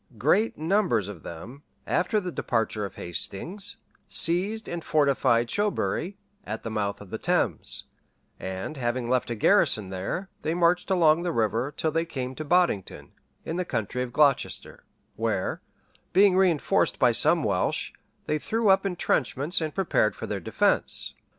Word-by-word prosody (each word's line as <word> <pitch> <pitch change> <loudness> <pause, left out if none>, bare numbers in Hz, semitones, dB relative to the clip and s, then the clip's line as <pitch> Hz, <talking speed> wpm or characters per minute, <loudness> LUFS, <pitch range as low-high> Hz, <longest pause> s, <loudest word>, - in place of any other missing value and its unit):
Great 180 - +2
numbers 160 - +1
of 105 -5 -8
them, 115 - -9 0.2
after 210 +4 +1
the 180 -3 -5
departure 110 -7 -1
of 95 - -8
Hastings, 180 - -4 0.3
seized 195 +7 +2
and 170 -1 -5
fortified 135 -5 +2
Shobury, 205 - -1 0.3
at - - -6
the 115 - -4
mouth 100 -2 -2
of 100 - -12
the - - -4
Thames; - - -1 0.6
and 95 +10 -5
having 120 -1 -2
left 125 0 0
a 120 - -2
garrison 105 -2 +3
there, 95 - -3
they 160 +2 -1
marched 175 +2 +2
along 170 -3 +4
the 175 0 -1
river, 115 +1 0
till 160 - 0
they 165 +1 +1
came 130 -5 -5
to 155 - -6
Boddington, 170 - 0 0.3
in 165 - -3
the 180 - 0
county 120 - -3
of 125 -1 -3
Glocester; 140 0 +1 0.3
where, 110 -4 -1 0.5
being 195 0 +6
reënforced 185 -5 +2
by - - +4
some - - +3
Welsh, - - 0 0.3
they 150 - -1
threw 225 +5 0
up 195 +1 +4
intrenchments, 165 -3 0
and 155 -2 -3
prepared 170 - +1
for - - -6
their - - -3
defence. - - +1
150 Hz, 155 wpm, -26 LUFS, 115-180 Hz, 0.6 s, being